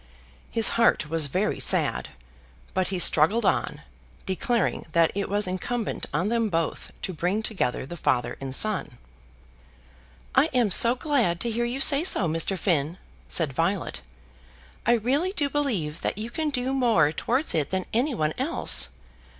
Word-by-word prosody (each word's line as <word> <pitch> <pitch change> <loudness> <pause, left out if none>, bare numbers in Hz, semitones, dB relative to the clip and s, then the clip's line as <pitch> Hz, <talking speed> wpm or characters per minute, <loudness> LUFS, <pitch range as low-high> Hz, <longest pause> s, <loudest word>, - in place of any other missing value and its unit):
His 225 -1 +3
heart 160 -9 +2
was 165 -3 +1
very 185 +9 -1
sad, 65 - +1 0.6
but 185 -1 0
he 190 - -3
struggled 180 +6 +4
on, - - 0 0.4
declaring 225 +4 -1
that 165 -1 +3
it 200 0 -3
was 205 +1 0
incumbent 210 +5 -3
on 190 +4 -1
them 230 -1 0
both 165 -3 -3
to 185 - -3
bring 180 +6 -1
together 185 - -1
the 175 - -8
father 125 -7 -1
and 135 -1 -3
son. 190 - +1 1.4
"I - - +5
am 235 -5 +2
so 235 +6 +5
glad 250 - 0
to 235 - 0
hear 235 +2 -1
you 245 +3 -3
say 280 +2 +5
so, 205 - +2
Mr. 165 +4 -1
Finn," 165 -3 0 0.3
said 155 -6 0
Violet. 165 - -2 0.9
"I 240 - +5
really 270 - 0
do 290 -8 -1
believe 200 - -2
that - - -2
you 225 +3 -5
can 310 +3 -2
do 260 -1 -2
more 230 - +3
towards 255 - 0
it 150 -3 0
than 190 -1 -2
any 250 +4 0
one 155 -4 -1
else. 290 +6 +2
205 Hz, 160 wpm, -25 LUFS, 165-240 Hz, 1.4 s, I